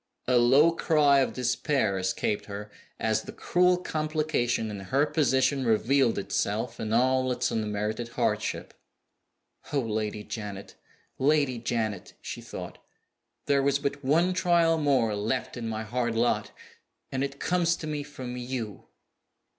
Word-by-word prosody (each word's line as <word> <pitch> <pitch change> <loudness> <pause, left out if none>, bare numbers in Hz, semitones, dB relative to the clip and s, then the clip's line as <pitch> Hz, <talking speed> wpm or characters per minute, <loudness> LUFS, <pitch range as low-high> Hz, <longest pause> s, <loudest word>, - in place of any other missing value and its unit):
A 125 -1 +4
low 135 +7 +6
cry 150 -4 +4
of 135 - +1
despair 125 -4 0
escaped 95 +2 -1
her, 105 +1 -7 0.3
as 110 0 +1
the - - -9
cruel 180 +1 +2
complication 155 -9 -1
in 100 - -6
her 130 +10 +1
position 135 -3 +2
revealed 120 +2 +2
itself 110 +4 -2
in 110 - -3
all 130 +2 +3
its 125 0 -1
unmerited 110 +1 -2
hardship. 120 - -2 1.0
"Oh, 145 - +2
Lady 105 -2 -3
Janet, 105 -3 -7 0.5
Lady 140 -3 +2
Janet!" 110 -4 -3
she - - -7
thought, - - -8 0.7
"there 140 -1 +3
was 140 0 +2
but 140 0 -3
one 165 +7 +3
trial 170 -2 +3
more 130 -8 +2
left 110 +5 -2
in 115 -2 -4
my 110 0 -3
hard 120 +1 -1
lot 120 +1 +1 0.6
and 135 0 -1
it 140 0 -4
comes 175 -1 +2
to 160 - -7
me 150 -1 -3
from 130 -4 -7
_you! 120 -4 -5
125 Hz, 140 wpm, -27 LUFS, 110-145 Hz, 1.0 s, low